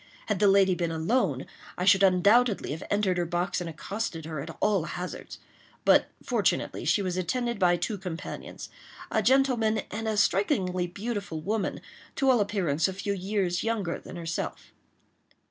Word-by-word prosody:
Had 210 Hz, -4 st, -1 dB
the 205 Hz, -, +5 dB
lady 195 Hz, -1 st, +5 dB
been 170 Hz, -2 st, -1 dB
alone, 160 Hz, -, 0 dB, 0.3 s
I 180 Hz, -, -1 dB
should 195 Hz, 0 st, +6 dB
undoubtedly 200 Hz, -, +4 dB
have 155 Hz, -, -5 dB
entered 195 Hz, -3 st, +1 dB
her 175 Hz, -, +1 dB
box 175 Hz, +1 st, -1 dB
and 170 Hz, -, -4 dB
accosted 165 Hz, 0 st, -4 dB
her 155 Hz, -2 st, -5 dB
at 160 Hz, +4 st, -7 dB
all 200 Hz, -6 st, +2 dB
hazards; 180 Hz, +1 st, -6 dB, 0.5 s
but, -, -, +5 dB, 0.2 s
fortunately, -, -, 0 dB
she 205 Hz, -, +2 dB
was 185 Hz, -1 st, -2 dB
attended 235 Hz, +5 st, -1 dB
by 175 Hz, -2 st, +4 dB
two 205 Hz, +2 st, -3 dB
companions—a 195 Hz, -, -6 dB
gentleman, 240 Hz, -2 st, +3 dB
and 220 Hz, +1 st, -4 dB
a 215 Hz, -1 st, 0 dB
strikingly 185 Hz, -2 st, +1 dB
beautiful 200 Hz, -3 st, -4 dB
woman, 210 Hz, +5 st, -2 dB, 0.3 s
to 270 Hz, -1 st, +3 dB
all 245 Hz, -, +4 dB
appearance 185 Hz, -7 st, +1 dB
a 190 Hz, -, -3 dB
few 200 Hz, +2 st, -2 dB
years 190 Hz, -2 st, -1 dB
younger 215 Hz, -7 st, -1 dB
than -, -, -11 dB
herself. 165 Hz, -1 st, -5 dB
195 Hz, 160 wpm, -27 LUFS, 175-215 Hz, 0.5 s, should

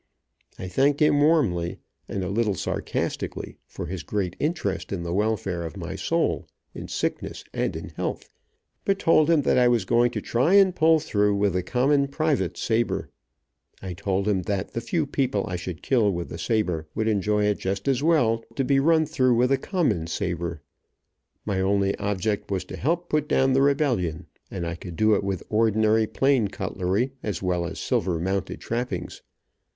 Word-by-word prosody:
I 95 Hz, -, -6 dB
thanked 140 Hz, +10 st, +2 dB
him 145 Hz, -1 st, +4 dB
warmly, 115 Hz, -, +2 dB, 0.3 s
and 95 Hz, -, -2 dB
a -, -, -2 dB
little 105 Hz, 0 st, +1 dB
sarcastically, -, -, -3 dB
for -, -, -6 dB
his 90 Hz, 0 st, -5 dB
great 95 Hz, -3 st, -2 dB
interest 150 Hz, -, -2 dB
in 95 Hz, -4 st, -3 dB
the 85 Hz, 0 st, -3 dB
welfare 100 Hz, -3 st, 0 dB
of 80 Hz, -3 st, -7 dB
my -, -, -5 dB
soul, -, -, 0 dB, 0.3 s
in -, -, -7 dB
sickness -, -, -3 dB
and -, -, -1 dB
in -, -, -6 dB
health, -, -, -4 dB, 0.6 s
but 195 Hz, -1 st, +1 dB
told 165 Hz, -4 st, +4 dB
him 160 Hz, -4 st, +4 dB
that 130 Hz, -, +3 dB
I 125 Hz, -, +5 dB
was 120 Hz, -5 st, +2 dB
going 120 Hz, +3 st, +3 dB
to -, -, -4 dB
try 130 Hz, +11 st, +2 dB
and 195 Hz, -2 st, +5 dB
pull 160 Hz, -1 st, +5 dB
through 105 Hz, -8 st, +1 dB
with 100 Hz, -2 st, +1 dB
a 90 Hz, -, +1 dB
common 135 Hz, +8 st, +2 dB
private's 150 Hz, +1 st, -1 dB
saber. 115 Hz, +1 st, 0 dB, 0.7 s
I 95 Hz, -2 st, -6 dB
told 95 Hz, +2 st, -1 dB
him 100 Hz, -3 st, +2 dB
that 100 Hz, -1 st, -2 dB
the 115 Hz, -, -2 dB
few 160 Hz, +5 st, -1 dB
people 130 Hz, -7 st, 0 dB
I 90 Hz, -, -3 dB
should 90 Hz, -2 st, -6 dB
kill 115 Hz, -6 st, +3 dB
with 85 Hz, -2 st, -4 dB
a -, -, -6 dB
saber, 90 Hz, -9 st, -1 dB
would 110 Hz, 0 st, 0 dB
enjoy 105 Hz, 0 st, +1 dB
it 105 Hz, -1 st, +1 dB
just 95 Hz, +6 st, -3 dB
as 135 Hz, -1 st, +2 dB
well 120 Hz, -8 st, +2 dB
to 135 Hz, -, 0 dB
be 135 Hz, +1 st, +3 dB
run 160 Hz, +2 st, +4 dB
through 130 Hz, -5 st, +2 dB
with 125 Hz, +3 st, +2 dB
a 135 Hz, -, +4 dB
common 150 Hz, -, 0 dB
saber. 85 Hz, -3 st, -3 dB, 0.8 s
My 100 Hz, -3 st, 0 dB
only 100 Hz, 0 st, +1 dB
object 100 Hz, 0 st, -1 dB
was 95 Hz, -2 st, -2 dB
to -, -, -8 dB
help 170 Hz, +5 st, -1 dB
put 150 Hz, -1 st, 0 dB
down 135 Hz, -3 st, +3 dB
the 135 Hz, -, +4 dB
rebellion, 135 Hz, -, +1 dB, 0.2 s
and 85 Hz, -, -4 dB
I 85 Hz, -, -2 dB
could 85 Hz, 0 st, -8 dB
do 110 Hz, +4 st, +3 dB
it 100 Hz, -, +1 dB
with 95 Hz, -3 st, -2 dB
ordinary 110 Hz, 0 st, +3 dB
plain 135 Hz, -4 st, +2 dB
cutlery, 95 Hz, +3 st, -1 dB
as 100 Hz, -4 st, -4 dB
well 90 Hz, -2 st, 0 dB
as 90 Hz, -, -7 dB
silver 95 Hz, -10 st, 0 dB
mounted 95 Hz, +2 st, -2 dB
trappings. 120 Hz, +2 st, -4 dB
110 Hz, 185 wpm, -25 LUFS, 95-135 Hz, 0.8 s, I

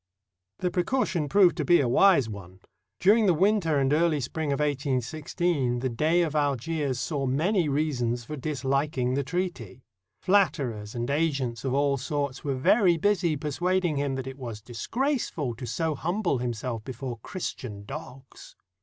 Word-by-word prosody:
The 180 Hz, -, -1 dB
precaution 180 Hz, -, 0 dB
proved 190 Hz, +1 st, +5 dB
to 155 Hz, -, 0 dB
be 175 Hz, +5 st, +5 dB
a 135 Hz, -, +2 dB
wise 140 Hz, -, +5 dB
one. 95 Hz, -3 st, -10 dB, 0.4 s
During 210 Hz, +3 st, +5 dB
the 180 Hz, -, +4 dB
winter 190 Hz, -4 st, +2 dB
and 135 Hz, 0 st, +2 dB
early 160 Hz, -1 st, +2 dB
spring 145 Hz, +3 st, -3 dB
of 140 Hz, -, -1 dB
1816 145 Hz, 0 st, -1 dB
the 130 Hz, +2 st, -1 dB
Dey 155 Hz, +9 st, +2 dB
of 155 Hz, -2 st, -3 dB
Algiers 145 Hz, -1 st, 0 dB
saw 140 Hz, -3 st, -2 dB
many 165 Hz, +6 st, +1 dB
reasons 125 Hz, -5 st, 0 dB
for 150 Hz, -, -5 dB
disHking 135 Hz, -2 st, -1 dB
the 140 Hz, +1 st, 0 dB
treaty. 135 Hz, -, -4 dB, 0.4 s
Flatterers 140 Hz, -, +1 dB
and 120 Hz, 0 st, -2 dB
agents 140 Hz, -7 st, -1 dB
of 135 Hz, -1 st, -1 dB
all 140 Hz, 0 st, +2 dB
sorts 140 Hz, 0 st, -3 dB
were 140 Hz, -2 st, -1 dB
very 175 Hz, -, +4 dB
busy 175 Hz, -4 st, +1 dB
persuading 175 Hz, +3 st, 0 dB
him 140 Hz, -1 st, -1 dB
that 130 Hz, -1 st, -4 dB
it 135 Hz, +1 st, -8 dB
was 115 Hz, -4 st, -6 dB
disgraceful 165 Hz, -, -2 dB
to 120 Hz, +2 st, -7 dB
so 160 Hz, +3 st, -1 dB
humble 175 Hz, -, -1 dB
himself 120 Hz, -1 st, -3 dB
before 125 Hz, -1 st, -6 dB
Christian 110 Hz, -, -6 dB
dogs. 135 Hz, -1 st, -10 dB
145 Hz, 155 wpm, -27 LUFS, 125-170 Hz, 0.4 s, proved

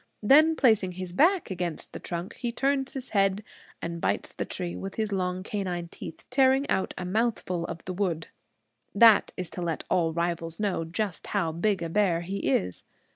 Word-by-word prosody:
Then 310 Hz, +8 st, +6 dB
placing 220 Hz, -10 st, +3 dB
his 185 Hz, -1 st, -6 dB
back 335 Hz, -, +3 dB
against 175 Hz, -3 st, -2 dB
the -, -, -6 dB
trunk, 175 Hz, +2 st, -5 dB
he 240 Hz, -2 st, -3 dB
turns 270 Hz, +2 st, 0 dB
his 260 Hz, -1 st, -4 dB
head 195 Hz, 0 st, +2 dB, 0.4 s
and 170 Hz, 0 st, -4 dB
bites -, -, 0 dB
into -, -, -20 dB
the -, -, -1 dB
tree 175 Hz, -2 st, -3 dB
with 195 Hz, 0 st, -6 dB
his 215 Hz, -1 st, -1 dB
long 185 Hz, -1 st, -1 dB
canine 180 Hz, -4 st, -3 dB
teeth, 160 Hz, -, -9 dB
tearing 265 Hz, +1 st, +4 dB
out 190 Hz, -, 0 dB
a 180 Hz, -, -4 dB
mouthful 185 Hz, -4 st, -1 dB
of 170 Hz, -1 st, -7 dB
the 185 Hz, -, -4 dB
wood. 175 Hz, -4 st, -2 dB, 0.7 s
That 225 Hz, 0 st, +7 dB
is 180 Hz, -3 st, -4 dB
to 180 Hz, -, -6 dB
let 165 Hz, -2 st, -2 dB
all 170 Hz, -3 st, +2 dB
rivals 170 Hz, 0 st, -2 dB
know 195 Hz, -5 st, -1 dB
just 185 Hz, +2 st, -3 dB
how 160 Hz, -, +1 dB
big 185 Hz, +2 st, 0 dB
a 165 Hz, -, -3 dB
bear 180 Hz, -2 st, +2 dB
he 190 Hz, +3 st, -4 dB
is. 90 Hz, -8 st, 0 dB
185 Hz, 190 wpm, -27 LUFS, 170-220 Hz, 0.7 s, That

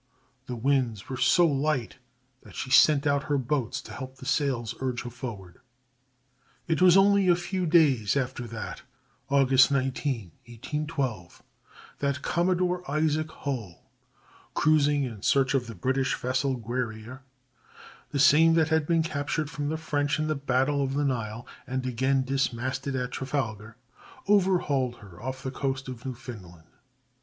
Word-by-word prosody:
The 125 Hz, -, -4 dB
winds 120 Hz, -4 st, 0 dB
were 130 Hz, -, -4 dB
so 175 Hz, +6 st, +4 dB
light 140 Hz, -4 st, 0 dB, 0.4 s
that -, -, -15 dB
she 130 Hz, -, -5 dB
sent 145 Hz, +1 st, +6 dB
out 140 Hz, -1 st, +1 dB
her 145 Hz, -1 st, +1 dB
boats 130 Hz, -2 st, -1 dB
to -, -, -10 dB
help 130 Hz, -1 st, -7 dB
the 130 Hz, -, -12 dB
sails 130 Hz, -6 st, 0 dB
urge 130 Hz, -2 st, -2 dB
her 120 Hz, -, -7 dB
forward. 110 Hz, -8 st, -8 dB, 1.1 s
It 165 Hz, +1 st, 0 dB
was 185 Hz, 0 st, +7 dB
only 200 Hz, 0 st, +5 dB
a 175 Hz, -, +6 dB
few 180 Hz, +1 st, -2 dB
days 140 Hz, -, +3 dB
after 125 Hz, -2 st, -3 dB
that 115 Hz, -1 st, -7 dB, 0.5 s
(August 135 Hz, -1 st, +5 dB
19, 130 Hz, -, -1 dB, 0.2 s
1812) 130 Hz, -, -4 dB, 0.6 s
that 140 Hz, -1 st, -1 dB
Commodore 180 Hz, +1 st, +1 dB
Isaac 155 Hz, +1 st, 0 dB
Hull, 125 Hz, -, -6 dB, 0.6 s
cruising 145 Hz, -2 st, +3 dB
in 115 Hz, -6 st, -6 dB
search 135 Hz, +4 st, +2 dB
of 130 Hz, -3 st, 0 dB
the 115 Hz, -, -8 dB
British 130 Hz, +7 st, 0 dB
vessel 130 Hz, +1 st, -1 dB
Guerrière 120 Hz, +1 st, -4 dB, 0.9 s
(the -, -, -3 dB
same 155 Hz, +4 st, +6 dB
that 160 Hz, -1 st, +3 dB
had 160 Hz, -2 st, +1 dB
been 165 Hz, -1 st, +2 dB
captured 150 Hz, 0 st, -2 dB
from 145 Hz, -2 st, -3 dB
the 160 Hz, -, -2 dB
French 150 Hz, -1 st, -1 dB
in 155 Hz, -, -1 dB
the 155 Hz, -, 0 dB
battle 140 Hz, 0 st, 0 dB
of 135 Hz, 0 st, -2 dB
the 145 Hz, 0 st, +1 dB
Nile, 115 Hz, -3 st, -3 dB, 0.2 s
and 130 Hz, 0 st, -3 dB
again 130 Hz, +2 st, +1 dB
dismasted 130 Hz, 0 st, -2 dB
at 125 Hz, -1 st, -2 dB
Trafalgar), 115 Hz, -5 st, -4 dB, 0.5 s
overhauled 175 Hz, -11 st, +2 dB
her 100 Hz, -5 st, -14 dB
off 130 Hz, +1 st, -5 dB
the 130 Hz, -, -3 dB
coast 135 Hz, 0 st, -3 dB
of 125 Hz, -1 st, -7 dB
Newfoundland. 105 Hz, -10 st, -9 dB
135 Hz, 150 wpm, -27 LUFS, 120-150 Hz, 1.1 s, was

